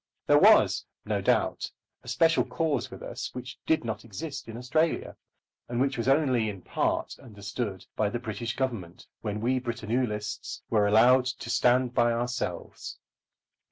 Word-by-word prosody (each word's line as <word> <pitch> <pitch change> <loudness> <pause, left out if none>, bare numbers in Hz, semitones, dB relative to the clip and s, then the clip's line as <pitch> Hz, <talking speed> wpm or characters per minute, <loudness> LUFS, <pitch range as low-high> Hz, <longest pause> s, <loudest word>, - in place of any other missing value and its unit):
There - - +6
was, - - +6 0.2
no - - -1
doubt, - - +1 0.3
a - - -18
special 165 0 +3
cause 155 -7 -1
with - - -10
us - - -5
which 125 -1 -7
did 160 - +3
not 110 -2 -4
exist 120 - -6
in 115 0 -7
Australia, 155 +7 0 0.5
and 120 0 -2
which 135 +1 +1
was 115 +1 -2
only, 130 -6 +3
in 100 -3 -8
part, - - -1
understood 105 -3 -5
by 105 -2 +1
the 120 - -2
British 115 0 -4
Government 115 -10 -3 0.2
when 105 -1 -3
we 130 +3 +1
Britannulists 115 -2 -3
were 105 -2 +4
allowed 125 +5 +6
to 125 -1 -4
stand 125 0 +3
by 120 -1 +3
ourselves. 120 +1 -4
120 Hz, 155 wpm, -28 LUFS, 110-130 Hz, 0.5 s, There